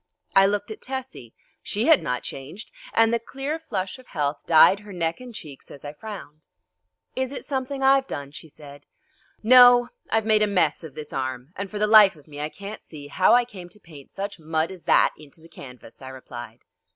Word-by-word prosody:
I 195 Hz, 0 st, +7 dB
looked 205 Hz, +1 st, -2 dB
at 215 Hz, -, -9 dB
Tessie. 260 Hz, -, -7 dB, 0.3 s
She 215 Hz, +3 st, -2 dB
had 320 Hz, -2 st, +5 dB
not 125 Hz, 0 st, -3 dB
changed, 150 Hz, +10 st, -9 dB, 0.2 s
and 225 Hz, 0 st, +3 dB
the 235 Hz, -, +2 dB
clear 270 Hz, +7 st, -5 dB
flush 195 Hz, -7 st, -4 dB
of 255 Hz, -, -17 dB
health 145 Hz, -3 st, -2 dB
dyed 170 Hz, +4 st, +6 dB
her 210 Hz, 0 st, -13 dB
neck 170 Hz, -3 st, -2 dB
and 250 Hz, -1 st, -9 dB
cheeks 150 Hz, -, -11 dB
as 140 Hz, -, -12 dB
I 145 Hz, -, -6 dB
frowned. 155 Hz, -5 st, -10 dB, 0.7 s
"Is 260 Hz, 0 st, -2 dB
it 280 Hz, -, -7 dB
something 270 Hz, 0 st, -3 dB
I've 270 Hz, 0 st, +4 dB
done?" 140 Hz, -1 st, -6 dB
she 160 Hz, +2 st, -12 dB
said. 145 Hz, -1 st, -14 dB, 0.6 s
"No, 245 Hz, +1 st, +7 dB, 0.2 s
I've 220 Hz, -1 st, +1 dB
made 215 Hz, -1 st, +3 dB
a 210 Hz, -, +3 dB
mess 180 Hz, -6 st, +1 dB
of 155 Hz, -4 st, -10 dB
this 150 Hz, -1 st, -8 dB
arm, 130 Hz, +3 st, -4 dB
and 200 Hz, +1 st, -5 dB
for 210 Hz, -, -6 dB
the 210 Hz, -, +2 dB
life 210 Hz, -3 st, +7 dB
of 150 Hz, -1 st, -20 dB
me 145 Hz, -1 st, -10 dB
I 150 Hz, -, -3 dB
can't 200 Hz, +5 st, -9 dB
see 145 Hz, -2 st, -11 dB
how 185 Hz, +9 st, +4 dB
I 245 Hz, 0 st, +3 dB
came 185 Hz, -7 st, -11 dB
to 210 Hz, -, -16 dB
paint 150 Hz, -7 st, -15 dB
such 200 Hz, -1 st, -6 dB
mud 160 Hz, +1 st, -1 dB
as 185 Hz, -2 st, -11 dB
that -, -, +4 dB
into 150 Hz, +1 st, -14 dB
the 165 Hz, -, -16 dB
canvas," 125 Hz, -6 st, -13 dB
I 130 Hz, -, -8 dB
replied. 120 Hz, -3 st, -10 dB
185 Hz, 210 wpm, -24 LUFS, 145-225 Hz, 0.7 s, I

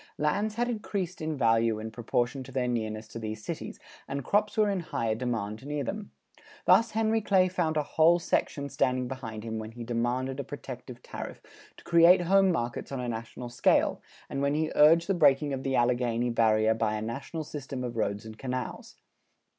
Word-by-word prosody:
Lands 205 Hz, +8 st, 0 dB
had 240 Hz, +1 st, 0 dB
increased 200 Hz, -6 st, -3 dB
in 155 Hz, -1 st, -2 dB
value 115 Hz, -2 st, +3 dB
in 110 Hz, +1 st, -6 dB
proportion 120 Hz, +4 st, -1 dB
to 135 Hz, -, -11 dB
their 125 Hz, -1 st, -1 dB
nearness 110 Hz, -2 st, -2 dB
to 115 Hz, -, -7 dB
these 110 Hz, -1 st, -6 dB
cities, -, -, -5 dB, 0.3 s
and 140 Hz, 0 st, -3 dB
crops 210 Hz, +8 st, +1 dB
were 215 Hz, -1 st, +4 dB
in 200 Hz, -2 st, 0 dB
higher 115 Hz, -9 st, -1 dB
demand 110 Hz, -2 st, -3 dB
near 145 Hz, 0 st, -3 dB
them. 210 Hz, +7 st, -5 dB, 0.6 s
Thus 230 Hz, +1 st, +5 dB
Henry 220 Hz, 0 st, +2 dB
Clay 190 Hz, -3 st, +4 dB
found 175 Hz, -4 st, -1 dB
a 150 Hz, -, +2 dB
whole 160 Hz, +3 st, +4 dB
section 145 Hz, -4 st, -1 dB
standing 130 Hz, -1 st, 0 dB
behind 115 Hz, -5 st, -6 dB
him 110 Hz, -1 st, -4 dB
when 110 Hz, +1 st, -7 dB
he 120 Hz, 0 st, -7 dB
demanded 120 Hz, +3 st, -1 dB
a -, -, -1 dB
protective 125 Hz, -3 st, -9 dB
tariff -, -, -7 dB, 0.4 s
to -, -, -15 dB
create 170 Hz, +1 st, +6 dB
home 195 Hz, +2 st, +4 dB
markets 120 Hz, -5 st, -3 dB
on 135 Hz, -, -3 dB
a 125 Hz, -, -3 dB
national 115 Hz, +1 st, -5 dB
scale, 120 Hz, -, +2 dB, 0.3 s
and 140 Hz, -, -3 dB
when 140 Hz, +1 st, +1 dB
he 155 Hz, 0 st, 0 dB
urged 165 Hz, +3 st, +6 dB
the 195 Hz, -, +1 dB
breaking 145 Hz, -4 st, +4 dB
of 130 Hz, -, -3 dB
the 135 Hz, 0 st, -1 dB
Alleghany 120 Hz, -1 st, +1 dB
barrier 110 Hz, -1 st, +3 dB
by 110 Hz, -1 st, 0 dB
a 105 Hz, -, -3 dB
national 140 Hz, +8 st, -5 dB
system 140 Hz, -3 st, -6 dB
of 120 Hz, -1 st, -4 dB
roads 105 Hz, -2 st, -1 dB
and 110 Hz, 0 st, -10 dB
canals. 130 Hz, -1 st, -5 dB
130 Hz, 195 wpm, -28 LUFS, 115-165 Hz, 0.6 s, create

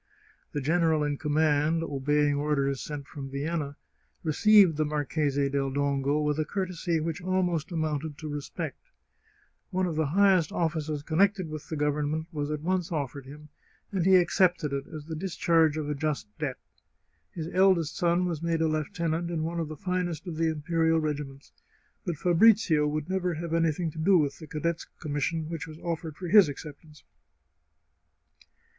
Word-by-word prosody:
The 145 Hz, -, -3 dB
general 160 Hz, +1 st, +2 dB
in 145 Hz, -1 st, -1 dB
command, 155 Hz, +1 st, +2 dB
obeying 145 Hz, 0 st, +1 dB
orders 140 Hz, -2 st, 0 dB
sent 145 Hz, -2 st, -6 dB
from 140 Hz, -2 st, -7 dB
Vienna, 145 Hz, +1 st, -3 dB, 0.5 s
received 185 Hz, +1 st, +5 dB
the 155 Hz, -, +2 dB
Marchese 145 Hz, -1 st, 0 dB
del 140 Hz, -1 st, 0 dB
Dongo 140 Hz, +1 st, 0 dB
with 150 Hz, 0 st, 0 dB
a -, -, +2 dB
courtesy 175 Hz, -1 st, -2 dB
which 160 Hz, +1 st, -3 dB
almost 180 Hz, -3 st, 0 dB
amounted 155 Hz, -2 st, -2 dB
to 155 Hz, -, -7 dB
re 145 Hz, -1 st, -3 dB
spect. -, -, -7 dB, 0.8 s
One 185 Hz, -1 st, 0 dB
of 170 Hz, -3 st, -2 dB
the 155 Hz, -1 st, +1 dB
highest 185 Hz, 0 st, +4 dB
offices 155 Hz, -3 st, -2 dB
connected 185 Hz, +2 st, +2 dB
with 155 Hz, +1 st, -7 dB
the 160 Hz, -, -3 dB
Gov 150 Hz, 0 st, +1 dB
ernment 155 Hz, +2 st, -2 dB
was 145 Hz, -3 st, -3 dB
at 150 Hz, -1 st, -3 dB
once 180 Hz, 0 st, -1 dB
offered 140 Hz, -3 st, -4 dB
him, 150 Hz, +2 st, -12 dB, 0.4 s
and 190 Hz, -4 st, 0 dB
he 190 Hz, +1 st, +6 dB
accepted 175 Hz, -4 st, +3 dB
it 140 Hz, 0 st, -3 dB
as 155 Hz, -2 st, -8 dB
the 160 Hz, 0 st, -5 dB
discharge 165 Hz, -2 st, +2 dB
of 155 Hz, -2 st, -3 dB
a 150 Hz, -, -1 dB
just 150 Hz, -3 st, -2 dB
debt. -, -, -2 dB, 0.8 s
His 160 Hz, -2 st, -4 dB
eldest 185 Hz, -4 st, +3 dB
son 175 Hz, 0 st, +2 dB
was 165 Hz, -4 st, -3 dB
made 165 Hz, -1 st, 0 dB
a -, -, +3 dB
lieutenant 165 Hz, +1 st, -1 dB
in 165 Hz, -2 st, -2 dB
one 170 Hz, +1 st, -2 dB
of 165 Hz, -, -2 dB
the 155 Hz, 0 st, -8 dB
finest 180 Hz, -3 st, -2 dB
of 175 Hz, -3 st, -5 dB
the 165 Hz, 0 st, +1 dB
imperial 160 Hz, +1 st, +1 dB
regiments, 145 Hz, -3 st, -4 dB, 0.6 s
but 170 Hz, -3 st, -1 dB
Fabrizio 175 Hz, -3 st, +4 dB
would 150 Hz, 0 st, -2 dB
never 180 Hz, -2 st, -1 dB
have 165 Hz, +1 st, -4 dB
anything 165 Hz, 0 st, +1 dB
to 160 Hz, -, -9 dB
do 185 Hz, +4 st, +5 dB
with 145 Hz, -4 st, 0 dB
the 155 Hz, -, -10 dB
cadet's 165 Hz, +2 st, -2 dB
commission 155 Hz, +2 st, -2 dB
which 165 Hz, -2 st, -5 dB
was 155 Hz, -1 st, -10 dB
offered 165 Hz, -2 st, -4 dB
for 180 Hz, -, -5 dB
his 190 Hz, -2 st, +7 dB
acceptance. 150 Hz, +1 st, -10 dB
155 Hz, 175 wpm, -28 LUFS, 150-170 Hz, 0.8 s, his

